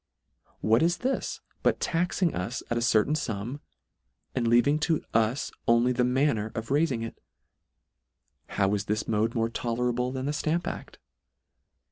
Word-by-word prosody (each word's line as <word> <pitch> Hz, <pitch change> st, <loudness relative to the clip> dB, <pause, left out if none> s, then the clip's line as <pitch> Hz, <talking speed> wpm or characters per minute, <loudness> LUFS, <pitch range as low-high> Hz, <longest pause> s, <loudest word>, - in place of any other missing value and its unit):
What 110 Hz, +2 st, +4 dB
is 170 Hz, +2 st, +2 dB
this 260 Hz, +2 st, -2 dB, 0.2 s
but -, -, +2 dB
taxing 170 Hz, +1 st, 0 dB
us 100 Hz, +7 st, -3 dB
at 120 Hz, -, +1 dB
a -, -, -3 dB
certain 115 Hz, +4 st, +3 dB
Jam, 120 Hz, 0 st, -3 dB, 0.7 s
and 120 Hz, -3 st, 0 dB
leaving 120 Hz, +6 st, +4 dB
to 160 Hz, 0 st, +1 dB
us 115 Hz, +4 st, +1 dB, 0.2 s
only 120 Hz, +2 st, +4 dB
the 125 Hz, 0 st, 0 dB
ttia?iner 125 Hz, -3 st, +2 dB
of 115 Hz, 0 st, -4 dB
raifing 135 Hz, -5 st, +1 dB
it? 115 Hz, -, -9 dB, 1.3 s
How 95 Hz, 0 st, +1 dB
is 105 Hz, 0 st, -1 dB
this 105 Hz, +1 st, -1 dB
mode 110 Hz, +2 st, +1 dB
more 115 Hz, -1 st, +2 dB
tolerable 125 Hz, +2 st, -1 dB
than 130 Hz, 0 st, -3 dB
the 145 Hz, -, -1 dB
Stamp 155 Hz, +3 st, 0 dB
act -, -, -6 dB
120 Hz, 150 wpm, -28 LUFS, 115-145 Hz, 1.3 s, What